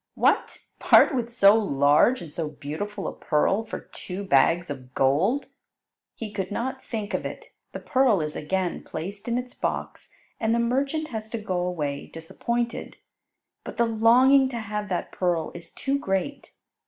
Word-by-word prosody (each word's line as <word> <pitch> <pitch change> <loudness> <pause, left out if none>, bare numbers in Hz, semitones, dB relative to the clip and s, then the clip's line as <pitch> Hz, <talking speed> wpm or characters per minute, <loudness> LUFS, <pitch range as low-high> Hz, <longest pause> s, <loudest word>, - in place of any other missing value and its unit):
"What! - - +2 0.2
part - - +6
with 240 -2 -2
so 205 -3 +6
large 150 - +3
and 155 -3 -11
so 160 -2 -3
beautiful 190 +8 -5
a - - -4
pearl 190 +7 +1
for 225 - -6
two 185 +2 -7
bags 170 +2 +3
of 130 -2 -9
gold?" 165 - +2 0.7
He 220 -2 -6
could 195 -3 -3
not 260 +5 -3
think 215 -3 -5
of - - -1
it. - - -8 0.2
The - - -7
pearl 255 -7 +3
is 150 -1 -3
again 180 +3 -2
placed 200 +6 -7
in 235 0 0
its 250 0 -5
box, - - -4 0.3
and 225 0 +1
the - - +1
merchant 275 +6 0
has 220 -2 -5
to 230 - -3
go 185 -4 -2
away 155 -6 -3
disappointed. 235 +9 -4 0.7
But - - -8
the 235 - +4
longing 250 +4 +5
to 240 -3 -4
have 210 -1 -4
that 180 - -2
pearl 175 -3 -1
is 170 -1 -10
too 275 +1 -1
great. 195 +6 -3
205 Hz, 165 wpm, -25 LUFS, 170-235 Hz, 0.7 s, part